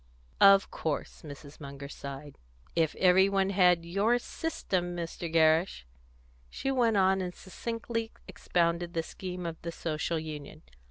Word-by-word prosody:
"Of 195 Hz, 0 st, +7 dB
course!" 155 Hz, -3 st, -4 dB
Mrs. 145 Hz, -1 st, -11 dB
Munger 140 Hz, 0 st, -8 dB
sighed. 140 Hz, 0 st, -9 dB, 0.4 s
"If 165 Hz, -2 st, +1 dB
everybody 190 Hz, +1 st, +4 dB
had 180 Hz, -3 st, +4 dB
your 200 Hz, +7 st, +2 dB
system, 185 Hz, -, -3 dB
Mr. 170 Hz, -1 st, -5 dB
Gerrish!" 160 Hz, -, +3 dB, 0.6 s
She 270 Hz, -, -3 dB
went 235 Hz, -5 st, +2 dB
on 190 Hz, 0 st, +3 dB
and 180 Hz, -1 st, -4 dB
succinctly 230 Hz, +3 st, -4 dB, 0.2 s
expounded 170 Hz, 0 st, -1 dB
the 165 Hz, -, 0 dB
scheme 180 Hz, +1 st, -6 dB
of 165 Hz, -1 st, -5 dB
the 170 Hz, -, -4 dB
Social 165 Hz, 0 st, -2 dB
Union. 155 Hz, -2 st, -7 dB
175 Hz, 130 wpm, -29 LUFS, 160-195 Hz, 0.6 s, Of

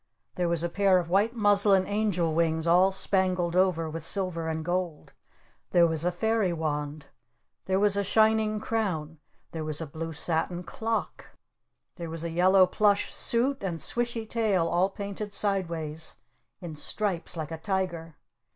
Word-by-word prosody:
There 175 Hz, -1 st, -1 dB
was 170 Hz, -1 st, 0 dB
a -, -, +1 dB
pair 190 Hz, +2 st, +3 dB
of 170 Hz, -1 st, -2 dB
white 210 Hz, +5 st, +2 dB
muslin 205 Hz, -3 st, +4 dB
angel 200 Hz, -6 st, 0 dB
wings 160 Hz, 0 st, +1 dB
all 180 Hz, +3 st, +5 dB
spangled 185 Hz, -3 st, 0 dB
over 180 Hz, -3 st, +2 dB
with 160 Hz, +1 st, -5 dB
silver 170 Hz, -1 st, -2 dB
and 160 Hz, -1 st, -3 dB
gold! 175 Hz, -3 st, -3 dB, 0.6 s
There 175 Hz, -1 st, +5 dB
was 160 Hz, -1 st, 0 dB
a 180 Hz, -, +1 dB
fairy 220 Hz, +1 st, 0 dB
wand! 150 Hz, -2 st, -3 dB, 0.6 s
There 190 Hz, 0 st, +1 dB
was 205 Hz, 0 st, +3 dB
a 200 Hz, -, +1 dB
shining 215 Hz, +1 st, +2 dB
crown! 170 Hz, -9 st, -2 dB, 0.3 s
There 160 Hz, -1 st, -5 dB
was 155 Hz, -1 st, -2 dB
a 165 Hz, -, -4 dB
blue 160 Hz, +3 st, -6 dB
satin 170 Hz, +3 st, -2 dB
clock! 225 Hz, +5 st, -4 dB, 0.6 s
There 170 Hz, -2 st, -6 dB
was 165 Hz, 0 st, -5 dB
a 170 Hz, -, -3 dB
yellow 185 Hz, +3 st, +5 dB
plush 205 Hz, +2 st, +1 dB
suit 260 Hz, +4 st, +2 dB
and 175 Hz, -4 st, -3 dB
swishy 235 Hz, +1 st, -2 dB
tail 215 Hz, -7 st, +1 dB
all 175 Hz, +3 st, +2 dB
painted 200 Hz, 0 st, -6 dB
sideways 165 Hz, -6 st, -1 dB, 0.5 s
in 170 Hz, -3 st, -7 dB
stripes 180 Hz, +2 st, -1 dB
like 155 Hz, -1 st, -5 dB
a 160 Hz, -, -5 dB
tiger! 170 Hz, -3 st, -3 dB
180 Hz, 160 wpm, -27 LUFS, 165-200 Hz, 0.6 s, all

